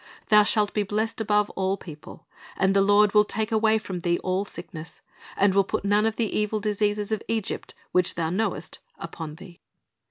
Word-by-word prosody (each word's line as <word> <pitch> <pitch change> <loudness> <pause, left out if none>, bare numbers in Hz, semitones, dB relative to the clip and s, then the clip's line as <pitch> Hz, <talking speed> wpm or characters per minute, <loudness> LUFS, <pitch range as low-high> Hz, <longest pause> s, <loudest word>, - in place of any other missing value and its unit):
Thou 210 -1 +7
shalt 210 0 +2
be 210 - +1
blessed 215 +3 -2
above 210 -1 +1
all 190 +1 -1
people.... 155 -5 -12 0.3
And 190 +1 +2
the 195 - +5
Lord 205 +1 +4
will 210 -1 +6
take 215 +1 -3
away 220 0 +3
from 190 -4 -5
thee 175 0 0
all 185 +2 0
sickness, 165 -4 -9 0.4
and 200 -1 +3
will 195 0 +4
put 195 - -3
none 205 +2 +3
of 220 - -2
the 225 -3 -2
evil 210 0 0
diseases 210 0 -1
of 220 -1 -1
Egypt, 225 -3 -3 0.2
which 180 -1 +1
thou 165 -1 -1
knowest, 220 +5 -2 0.2
upon 155 -2 -7
thee."' 175 0 -14
205 Hz, 190 wpm, -25 LUFS, 190-215 Hz, 0.4 s, Thou